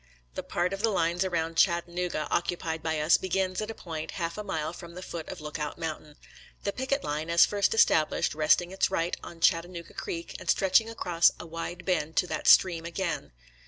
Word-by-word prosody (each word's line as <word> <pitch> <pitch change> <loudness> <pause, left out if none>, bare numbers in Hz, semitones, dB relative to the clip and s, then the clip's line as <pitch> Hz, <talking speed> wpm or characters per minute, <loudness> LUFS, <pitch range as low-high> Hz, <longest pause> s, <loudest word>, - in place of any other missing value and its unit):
* - - -30
« - - -39
♦ - - -36
The - - -4
part 180 +2 -1
of 195 - -4
the 225 - +3
lines 175 -2 +1
around 165 -3 -2
Chattanooga 175 -2 +1
oc 170 - +1
cupied 165 -2 -3
by 160 -1 -1
us 155 +3 +5
begins 185 +1 -1
at 215 - -4
a 225 - -5
point 160 -2 -6
half 170 -2 -2
a 210 - -5
mile 160 -4 -3
from 170 -1 -10
the 180 - -7
foot 165 -3 -6
of 185 - -7
Lookout 150 0 -5
Mountain; 155 -2 -5 0.5
the 200 - -1
picket 270 +2 -1
line, 150 +2 -3
as 170 0 +6
first 205 +1 +1
established, 155 -8 +3
resting 155 +4 +3
its 190 - +1
right 165 +2 0
on 170 - -10
Chat 165 -1 +4
tanooga 175 -1 -10
Creek, 170 0 -5
and - - -8
stretching 195 +4 +4
across 175 -7 +3
a - - -7
wide 165 +1 -6
bend 160 -4 0
to - - +3
that - - -4
stream 170 -3 +6
again. 170 0 -3
170 Hz, 220 wpm, -28 LUFS, 160-185 Hz, 0.5 s, as